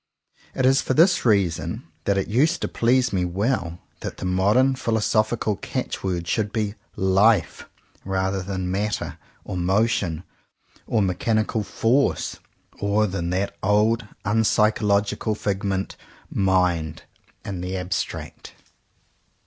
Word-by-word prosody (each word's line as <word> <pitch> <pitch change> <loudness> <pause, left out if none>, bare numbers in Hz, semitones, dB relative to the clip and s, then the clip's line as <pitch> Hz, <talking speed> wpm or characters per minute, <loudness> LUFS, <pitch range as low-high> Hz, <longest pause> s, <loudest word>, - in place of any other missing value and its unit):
It 130 - +1
is 135 +1 +5
for 130 - -1
this 170 0 +4
reason 100 -7 +1 0.2
that 100 -1 +2
it 95 - 0
used 150 +10 +2
to - - +1
please 125 0 +2
me 90 -2 +1
well 90 -1 -1 0.2
that - - -6
the - - -5
modern 100 +9 +3
philosophical 110 -3 0
catch - - -4
word 90 -3 -2
should 105 0 0
be 105 -3 -1 0.2
"Life," 95 +1 +2 0.3
rather 95 0 -1
than 95 -1 -3
"Matter" 105 +2 -2 0.3
or 95 - -4
"Motion" 95 -2 +1 0.6
or 110 -3 +2
mechanical 110 +4 0
"F'orce" 115 +6 0 0.4
or 100 +1 +2
than 90 -4 -3
that 95 +3 -1
old 105 +3 +2 0.2
unpsychological 105 0 +2
figment, 100 -1 -2 0.4
"Mind" 90 -5 +1 0.4
in 95 -3 -4
the 95 +1 -3
abstract. 90 0 -4
100 Hz, 120 wpm, -23 LUFS, 95-110 Hz, 0.6 s, is